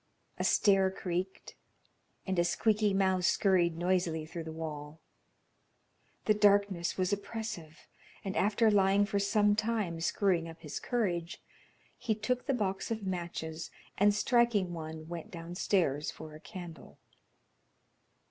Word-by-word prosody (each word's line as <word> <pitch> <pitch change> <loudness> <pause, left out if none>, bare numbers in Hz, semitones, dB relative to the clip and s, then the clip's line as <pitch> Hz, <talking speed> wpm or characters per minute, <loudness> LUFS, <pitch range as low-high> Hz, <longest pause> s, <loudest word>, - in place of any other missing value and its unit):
A - - 0
stair 195 -2 +4
creaked, 185 0 -4 0.7
and 190 -2 0
a - - +5
squeaky 210 +4 +2
mouse 190 -2 +2
scurried 175 -4 +3
noisily 175 -3 0
through 160 +1 -7
the 160 - -5
wall. 155 -1 -6 1.3
The 215 - +5
darkness 200 -4 +3
was 185 +1 +1
oppressive, 200 -6 -6 0.4
and 195 - -3
after 215 +2 +3
lying 200 0 +4
for 200 0 -1
some 205 +1 +3
time 215 -6 -1
screwing 175 -2 +1
up 165 0 -12
his 150 - -5
courage, 180 -8 -1 0.6
he 225 -3 0
took 250 +5 -2
the 275 - +2
box 195 -4 -2
of 220 -3 -3
matches, 170 -3 -4 0.3
and 205 +1 +5
striking 210 -4 +2
one, 160 -1 -7
went 170 -1 -6
downstairs 170 -3 -1
for 155 -1 -9
a 155 - -10
candle. 175 -3 -10
190 Hz, 130 wpm, -31 LUFS, 165-205 Hz, 1.3 s, a